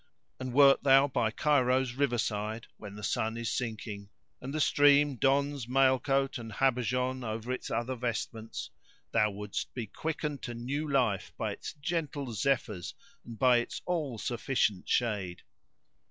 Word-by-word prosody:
And 130 0 -4
wert 140 +1 +6
thou 135 0 +6
by 125 -5 0
Cairo's 130 -1 +2
river 130 -2 +1
side,[FN#582] 110 0 -2
when 105 -1 -9
the 105 - -9
sun 110 +3 -1
is 115 -2 -2
sinking 110 -4 -4 0.3
and 130 - -5
the 155 - -2
stream 145 -1 +5
dons 140 +1 +1
mail 130 0 +4
coat 135 0 0
and 115 -2 -8
habergeon[FN#583] 125 +1 0
over 115 +2 -4
its 130 - -4
other 120 +3 -1
vestments, 115 -2 -4 0.4
thou 105 -2 +3
wouldst 105 0 -5
be 120 -3 -3
quickened 150 +4 -4
to 120 - -5
new 140 +6 -3
life 125 -8 +1
by - - -2
its - - -7
gentle 145 -4 -3
zephyrs 110 -4 -1 0.3
and 115 -1 -9
by 125 0 +5
its 120 - -3
all 155 -9 -2
sufficient 115 -4 -1
shade." 100 -7 0
125 Hz, 155 wpm, -30 LUFS, 110-135 Hz, 0.4 s, wert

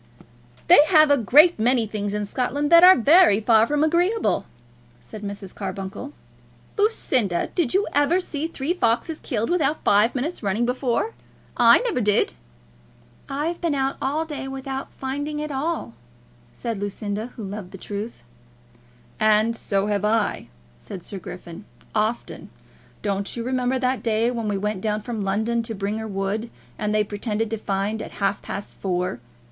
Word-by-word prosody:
"They 350 - +8
have 310 -3 +6
a 285 - +5
great 295 - +6
many 240 +1 +3
things 205 -1 -3
in 210 0 -2
Scotland 275 +7 -2
that 335 +1 +8
are 370 +1 +10
very 280 - +5
far 220 0 +4
from 295 0 +1
agreeable," 350 +8 +1 0.5
said 215 - -11
Mrs. 200 -2 -7
Carbuncle. 195 +7 -6 0.6
"Lucinda, 260 - 0
did 345 -4 0
you 400 - +3
ever 290 +5 +3
see 320 -4 -3
three 320 0 -2
foxes 310 +1 0
killed 230 -2 -2
without 310 -4 0
five 210 +5 +3
minutes' 290 +7 -3
running, 210 +3 0
before? 250 - -1 0.4
I - - +6
never 470 - -1
did." 210 -1 +2 1.0
"I've 300 +5 -2
been 335 -4 0
out 270 0 0
all 305 +4 -1
day 295 -4 -6
without 270 0 -5
finding 285 +3 -4
at 300 0 -4
all," 285 - -3 0.6
said 220 - -5
Lucinda, 205 +2 -4
who 225 - -7
loved 195 -1 -6
the 195 - -10
truth. 205 - -6 1.0
"And 215 +1 +3
so 200 -3 -1
have 205 -1 -1
I," 220 +1 0 0.3
said 180 - -9
Sir 195 - -7
Griffin; 175 +1 -9 0.3
"often. 220 +2 -2 0.5
Don't 200 +1 -2
you 235 - -3
remember 255 +1 0
that 255 0 0
day 225 +1 +1
when 230 -3 -3
we 205 -1 0
went 210 -1 -2
down 215 0 -1
from 225 -1 -4
London 220 +4 0
to 225 -1 -5
Bringher 210 +3 -3
Wood, 200 +3 -2 0.3
and 210 0 -1
they 215 0 +2
pretended 210 +1 -3
to 225 - -1
find 205 +2 -2
at - - -8
half 200 0 -1
past 200 - -7
four? 180 -9 -2
230 Hz, 160 wpm, -23 LUFS, 205-285 Hz, 1.0 s, are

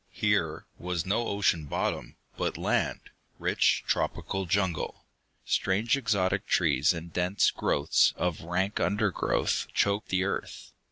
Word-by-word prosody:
Here - - 0
was 90 -2 -2
no 110 +5 0
ocean 95 -6 +1
bottom, 70 - -3 0.2
but - - -2
land, - - -1 0.3
rich - - +2
tropical 95 -1 -1
jungle. 95 -3 -1 0.4
Strange 105 +6 +1
exotic 105 -8 0
trees 70 +4 +3
and 85 -1 -6
dense 90 +3 +2
growths 70 - +2
of 90 -3 -1
rank 95 +5 -1
undergrowth 105 -1 0
choked 100 +1 +1
the 95 0 +1
earth. 100 - -4
95 Hz, 120 wpm, -28 LUFS, 85-100 Hz, 0.4 s, trees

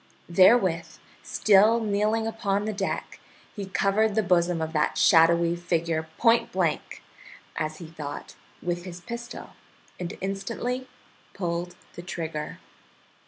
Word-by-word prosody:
Therewith, 185 -3 +4 0.2
still 215 +3 +4
kneeling 215 +1 +1
upon 210 -3 -1
the 215 - -2
deck, 195 -1 -3 0.4
he 200 -3 -5
covered 200 +2 +1
the 220 - +2
bosom 175 -2 +2
of 160 0 -3
that 150 -1 +1
shadowy 170 -1 +5
figure 170 -2 -1
point 230 -1 +3
blank, 175 -5 -2 0.5
as 155 0 -3
he 170 - -9
thought, 150 -3 -8 0.3
with 175 0 -2
his 175 -1 -8
pistol, 235 +4 -7 0.5
and 175 -1 -5
instantly 230 +7 -3 0.5
pulled 175 -1 -3 0.2
the 175 - -8
trigger. 160 -3 -5
180 Hz, 120 wpm, -26 LUFS, 170-210 Hz, 0.5 s, shadowy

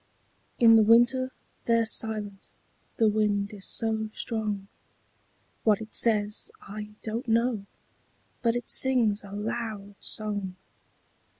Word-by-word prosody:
In 225 -1 +7
the - - +6
winter 240 +4 +4 0.3
they're 230 -1 +3
silent 215 -3 -2 0.5
the 225 - +4
wind 210 -1 +1
is 200 -2 -6
so 220 -1 0
strong; 210 -4 -3 1.0
What 210 -3 +3
it 220 -1 -9
says, 210 -2 +2
I 210 +1 -9
don't 230 +3 -4
know, 230 -2 +1 0.7
but 230 -1 +2
it 240 - -3
sings 235 -6 +3
a 200 - -11
loud 210 -1 -4
song. 205 -3 -4
220 Hz, 115 wpm, -27 LUFS, 205-230 Hz, 1.0 s, In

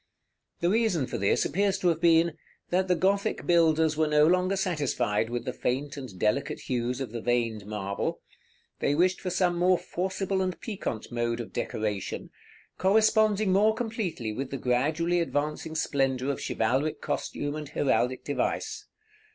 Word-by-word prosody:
The 170 - +2
reason 215 - +2
for - - -4
this 100 - +2
appears 195 +5 +1
to 185 -2 +2
have 165 -1 0
been, 165 -1 +4 0.4
that 185 +1 +2
the 180 - +3
Gothic 200 +4 0
builders 160 -2 +3
were 155 0 +2
no 150 0 +5
longer 180 +3 +3
satisfied 135 - 0
with 120 0 -3
the 125 - -3
faint 140 +3 -2
and 130 -9 -8
delicate 140 +10 0
hues 125 0 -2
of 135 -5 -4
the 115 -1 -5
veined 115 -4 -1
marble; 100 -2 -3 0.6
they 145 - +1
wished 180 +3 +2
for 185 - -2
some 180 -1 +1
more 180 +1 +4
forcible 190 +2 -2
and 185 -1 -2
piquant 195 - -5
mode 120 0 -1
of 115 - -7
decoration, 105 -3 -3 0.5
corresponding 215 0 +3
more 210 +3 +4
completely 215 - -3
with 130 +4 -4
the 135 - -4
gradually 155 +8 +1
advancing 155 0 -2
splendor 135 -3 0
of 140 - -5
chivalric 135 +7 0
costume 145 0 -3
and 150 -2 -6
heraldic 130 -3 +1
device. 145 - -2
155 Hz, 160 wpm, -28 LUFS, 125-185 Hz, 0.6 s, no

